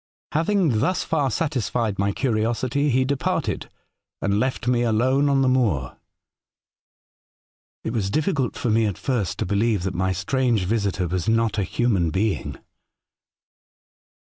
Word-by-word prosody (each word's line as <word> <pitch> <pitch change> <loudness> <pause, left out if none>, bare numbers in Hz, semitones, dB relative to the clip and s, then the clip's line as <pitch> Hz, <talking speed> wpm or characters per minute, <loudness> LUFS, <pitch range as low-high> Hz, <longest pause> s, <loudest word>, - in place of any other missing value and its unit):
Having 165 - +2
thus 180 +10 +1
far 145 -4 0
satis 140 - -1
fied 110 -5 -1
my 100 +1 +2
curiosity, 120 +5 0
he 130 0 +2
departed 140 0 -1 0.5
and 100 +1 0
left 130 0 -1
me 120 -1 +2
alone 130 +5 +2
on 135 -1 +3
the - - +2
moor. 105 - +1 0.9
'' - - -90
It 110 - -3
was 105 -5 -1
difficult 150 - 0
for 125 -5 -1
me 110 0 +3
at 100 - -3
first 120 -9 -1
to - - -2
believe 100 0 +1
that 95 0 -2
my 95 +2 0
strange 115 +3 0
visitor 100 -3 0
was 90 +2 -1
not 115 -1 +1
a - - +1
human 95 -5 +1
being. 100 +5 -1
115 Hz, 150 wpm, -23 LUFS, 100-130 Hz, 0.9 s, on